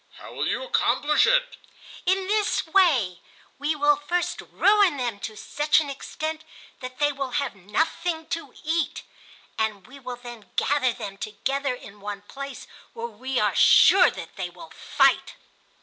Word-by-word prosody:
"How - - -12
will - - -2
you - - -1
accomplish 450 -11 +2
it?" - - +2 0.5
"In 380 +1 +2
this 420 +1 +1
way: 300 - +3 0.4
We 295 +2 0
will 290 0 +3
first 345 +5 -2
ruin 400 -6 +3
them 240 -5 -3
to 215 +1 -7
such 295 +7 +2
an 290 -3 -3
extent 315 +3 -5 0.4
that 255 0 -8
they 290 0 +2
will 275 -3 -5
have 280 -3 -1
nothing 320 - -2
to 330 -5 -4
eat, 320 +1 -1 0.6
and 215 -4 -1
we 275 +5 -13
will 250 -2 -6
then 240 -3 -11
gather 275 -3 +2
them 205 -5 -8
together 265 +6 -2
in 205 -4 -13
one 205 0 -6
place 275 +4 -8 0.3
where 230 - -5
we 245 +3 -3
are - - +2
sure 375 -2 +7
that 165 - -9
they 185 -2 -3
will 325 - -13
fight." - - +2
275 Hz, 160 wpm, -25 LUFS, 230-320 Hz, 0.6 s, sure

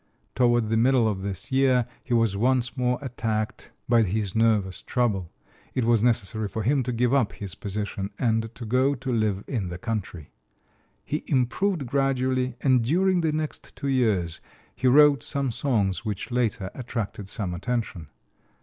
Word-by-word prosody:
Toward 120 -3 +2
the 110 - +2
middle 120 0 +4
of 100 -3 -2
this 95 +2 -5
year 130 -2 +3 0.2
he 130 - -12
was 115 -4 +3
once 125 +3 +1
more 125 -1 +1
attacked 110 -4 -3 0.2
by 120 -1 +5
his 105 -1 -1
nervous 110 -5 +2
trouble. 105 -9 -1 0.4
It 130 -3 +1
was 115 -2 +3
necessary 110 -2 0
for 105 +3 -4
him 135 +5 +2
to 125 0 -2
give 120 +1 +1
up 130 -7 +2
his 100 -3 -7
position 100 -1 -4
and 115 -2 +1
to 120 - -7
go 130 +5 +2
to 130 -1 -3
live 105 -3 0
in 110 -9 -2
the 90 - -5
country. 90 -7 -5 0.7
He 150 - -3
improved 140 +6 +1
gradually, 130 -1 0
and 130 -3 +3
during 180 +7 +2
the 160 -2 +1
next 155 0 -4
two 140 - -3
years 105 -11 +1 0.3
he 130 - 0
wrote 145 +2 +6
some 140 -3 -2
songs 110 -7 0
which 105 +1 -4
later 115 -5 -1
attracted 115 -5 -5
some 95 -6 -3
attention. 105 -4 -3
120 Hz, 165 wpm, -25 LUFS, 105-130 Hz, 0.7 s, wrote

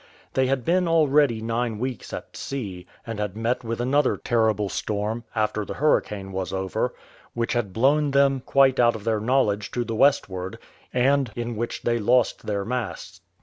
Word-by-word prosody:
They 130 -1 +2
had 130 -3 -1
been 180 +1 +2
already 145 -7 +3
nine 115 0 -1
weeks 125 0 -4
at - - -7
sea, 95 -10 -5 0.2
and 115 -2 -5
had 105 -1 -3
met 120 +3 -1
with 115 0 -3
another 130 +3 +2
terrible 110 -3 +1
storm, 105 +3 -3
after 110 -1 0
the - - -6
hurricane 105 -9 0
was 95 -1 -3
over, 95 -1 -2 0.4
which 115 -1 -1
had 120 -5 -1
blown 140 +8 +3
them 140 -1 +3
quite 135 -1 +4
out 120 -1 +4
of 110 - -7
their 110 -1 +1
knowledge 105 -3 +1
to 120 - 0
the 115 - -4
westward, 95 -7 +1 0.3
and 135 0 +2
in 120 0 -3
which 115 +2 -4
they 120 0 +1
lost 120 +2 +2
their 100 -2 -1
masts. 115 -8 -4
115 Hz, 175 wpm, -24 LUFS, 105-130 Hz, 0.4 s, quite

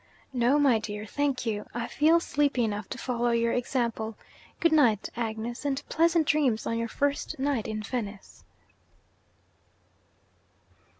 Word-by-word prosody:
'No, 250 +3 +3
my 270 -6 +4
dear, 210 -1 -5
thank 280 +2 -1
you; 210 -2 -2
I 235 -1 -2
feel 315 +6 +3
sleepy 285 -6 +1
enough 210 -2 -3
to 260 - -5
follow 240 -2 -1
your 235 0 +2
example. 235 -3 -1 0.4
Good 335 - +3
night, 240 -10 +3
Agnes 230 +1 -4
and 280 -2 0
pleasant 330 0 +3
dreams 280 -7 +2
on 230 - -1
your 230 - -1
first 285 +4 -1
night 270 -4 -1
in 215 0 -4
Venice.' 210 -3 -6
240 Hz, 135 wpm, -28 LUFS, 220-285 Hz, 0.4 s, my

